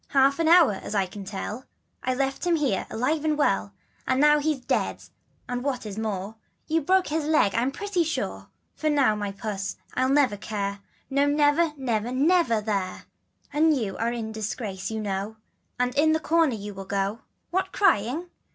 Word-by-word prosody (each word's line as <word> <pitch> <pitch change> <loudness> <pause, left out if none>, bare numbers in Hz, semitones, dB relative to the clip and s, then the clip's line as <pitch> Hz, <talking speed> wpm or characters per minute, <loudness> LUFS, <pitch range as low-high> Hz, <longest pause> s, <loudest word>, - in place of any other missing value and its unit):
An 275 +4 +4
hour 335 -6 +7
ago, 195 - -6
as - - -5
you 195 -2 +2
can 200 +2 -8
tell, 210 +5 -5 0.4
I 255 - -1
left 270 +5 -1
him 345 - +4
here, 275 - 0
alive 290 +7 0
and 305 -1 +1
well; 100 - +1 0.4
And 260 0 +2
now 295 +1 +6
he's 300 -1 0
dead - - -1 0.4
and, 245 0 -3
what 265 -4 -2
is 210 0 -5
more, 210 -1 -3 0.3
You've 320 -2 -1
broke 375 0 +3
his 310 0 -1
leg 300 -10 +3
I'm 240 +3 +1
pretty 385 +4 -1
sure. 320 0 -3 0.3
For 310 - -3
you 300 - +2 0.2
my 205 -1 -3
puss 195 -1 -4 0.2
I'll 260 0 +1
never 270 -7 +3
care, 200 -1 -3 0.3
No 280 +1 +3
never, 295 +2 +3
never, 240 -3 -1
never, 275 -4 +3
Mere, 195 -4 -2 0.5
And 310 0 +4
you 210 -6 -3
are 230 +1 0
in 225 -2 -4
disgrace 215 -2 -4
you 220 0 -3
know, 200 +1 -3 0.4
And 250 0 +1
in 315 +2 +4
the 315 - +2
corner 320 -5 +2
you 205 -1 -7
must 195 0 -9
go. 200 +2 -1 0.3
What 375 +1 0
crying? 335 - +1
255 Hz, 185 wpm, -26 LUFS, 210-305 Hz, 0.5 s, hour